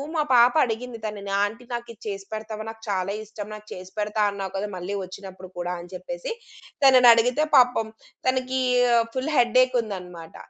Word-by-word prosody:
మా 310 - +2
పాప 240 0 +7
అడిగింది 235 +1 -4
తనని. 200 -2 -5
"ఆంటీ 220 +4 -3
నాకు 240 0 -4
ఇది 220 - -25
చేసి 195 -2 -5
పెడతావా 215 0 -5
నాకు 225 0 -10
చాలా 190 -1 -1
ఇష్టం 210 -1 -8
నాకు 215 0 -10
చేసి 185 +1 -10
పెడతా 210 +1 -1
అన్నావు 195 -2 -5
కదా! 195 +2 -2
మళ్ళీ 180 +2 -5
వచ్చినప్పుడు 185 0 -9
కూడ" 175 0 -3
అని 175 +1 -10
చెప్పేసి. - - -6 0.5
తనని 255 -2 +8
అడిగితే 245 +6 +2
పాపం 245 -4 +5 0.4
తనకీ 260 0 0 0.5
ఫుల్ 260 +4 -1
హెడ్ 240 0 +3
ఏక్ 255 0 -3
ఉందనమాట. 180 -6 -8
215 Hz, 170 wpm, -24 LUFS, 195-250 Hz, 0.5 s, తనని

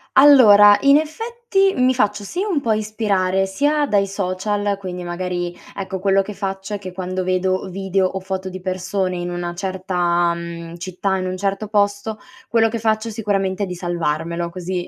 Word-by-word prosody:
Allora 215 -8 +8
in 280 +1 +6
effetti 390 +4 0
mi 255 0 +3
faccio 210 -3 0
sia 370 - -3
un 320 -7 +1
po' 230 -4 0
ispirare 200 -3 0
sia 290 +9 +1
dai 200 -4 +2
social, 200 +1 -1
quindi 180 -2 -6
magari, 175 0 -3 0.2
ecco, 190 -1 -4
quello 195 0 +3
che 210 +1 -8
faccio 195 +1 -4
è - - -2
che 185 -2 -8
quando 185 0 -3
vedo 185 +1 0
video 190 0 0
o 190 - -3
foto 190 0 -4
di 185 0 -7
persone 185 0 -2
in 175 0 -4
una 175 0 -4
certa, 175 -2 0
mhmm, 170 0 -7
città, 185 +2 -2
in 185 - -3
un 185 0 -3
certo 200 +2 -2
posto, 205 +1 0 0.3
quello 225 -1 +3
che 230 +1 -3
faccio 220 +1 0
sicuramente 200 -2 -1
è - - 0
di 180 - -5
salvarmelo 170 -1 -2
così 180 0 -4
195 Hz, 180 wpm, -20 LUFS, 180-210 Hz, 0.3 s, Allora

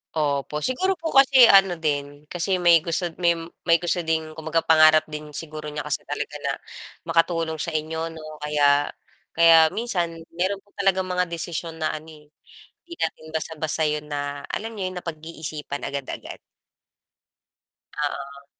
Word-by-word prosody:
Opo, 150 0 -1
siguro 375 +9 +1
po 325 -2 -4
kasi 265 -3 +7
ano 195 -2 +6
din, 145 -2 -3
kasi 180 +2 0
may 170 -1 +7
gusto 170 +1 -2
may 170 -1 +3 0.3
may 165 - +6
gusto 175 +1 0
din 160 -1 0
kumbaga 160 +1 -1
pangarap 155 -1 +6
din 150 -1 -8
siguro 155 -1 -6
niya 150 0 -4
kasi - - -3
talaga - - -4
na - - +1 0.5
makatulong 165 -1 0
sa 165 0 -2
inyo, 160 +1 -2
'no, 155 -1 -10
kaya 145 -1 +3 0.5
kaya 165 -1 +7
minsan 180 -8 -1 0.2
meron 190 +3 -2
po 205 - -30
talagang 190 -1 +2
mga 180 0 0
desisyon 165 0 -4
na 155 -1 -1
ano 155 +1 -7
hindi 150 -1 -18 0.5
natin 160 -1 -3
basta-basta 160 0 -2
'yon 150 0 -1
na, 145 -1 -4
alam 225 +2 -4
niyo 185 -1 -1
'yon, 185 - -9
napag-iisipan 155 -3 -6
agad-agad. 140 -1 -6 1.6
Oo. 140 -1 -4
160 Hz, 150 wpm, -24 LUFS, 150-175 Hz, 1.6 s, kasi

